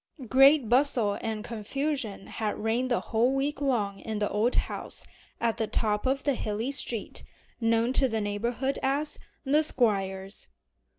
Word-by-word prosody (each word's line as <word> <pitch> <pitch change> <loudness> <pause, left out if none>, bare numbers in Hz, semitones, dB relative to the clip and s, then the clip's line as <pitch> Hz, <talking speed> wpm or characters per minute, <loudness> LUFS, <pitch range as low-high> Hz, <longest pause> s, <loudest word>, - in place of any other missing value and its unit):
A 260 - -7
great 270 +2 +6
bustle 245 -4 +2
and 220 -1 -3
confusion 235 -1 -3
had 215 -2 -3
reigned 230 +4 0
the 240 - +2
whole 235 +4 +1
week 280 +1 -1
long 210 -8 0
in 220 -1 -4
the 210 0 -1
old 220 +4 +1
house - - -3 0.3
at 230 -1 +1
the 220 - 0
top 210 +1 0
of 270 +1 0
the 285 - +2
hilly 225 +2 -2
street, 240 -5 -2 0.4
known 230 +1 +2
to 265 - +4
the 225 -2 -1
neighborhood 235 +6 -1
as 285 +3 -1 0.3
"the 290 +3 +4
Squire's." 195 -8 0
235 Hz, 160 wpm, -28 LUFS, 215-270 Hz, 0.4 s, great